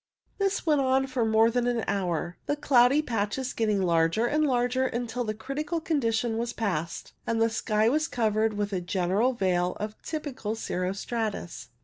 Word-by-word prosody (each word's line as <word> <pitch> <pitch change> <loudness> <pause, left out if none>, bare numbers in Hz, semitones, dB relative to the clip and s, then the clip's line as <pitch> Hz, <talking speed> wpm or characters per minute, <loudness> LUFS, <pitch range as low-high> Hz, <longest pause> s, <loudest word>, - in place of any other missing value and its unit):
This 395 -2 0
went 300 -3 +3
on 265 0 +2
for 255 -3 -1
more 220 +1 +4
than 245 0 0
an 240 -2 0
hour, 175 -3 -1
the 290 - +1
cloudy 280 0 +4
patches 230 +2 -2
getting 210 -4 +1
larger 170 +5 +2
and 300 +5 +1
larger, 250 0 +1
until 245 0 -3
the 215 -2 -3
critical 295 +8 -3
condition 235 -8 0
was 235 0 -2
passed, 170 -7 -3
and 230 -1 0
the 225 0 +3
sky 215 -1 +1
was 305 +6 +2
covered 220 -4 +1
with 205 0 -2
a 185 - -1
general 190 +7 +1
veil 180 -4 0
of 210 +1 -4
typical 270 -9 -4
cirro 185 -4 -2
stratus. 200 - -4
225 Hz, 170 wpm, -27 LUFS, 205-260 Hz, -, more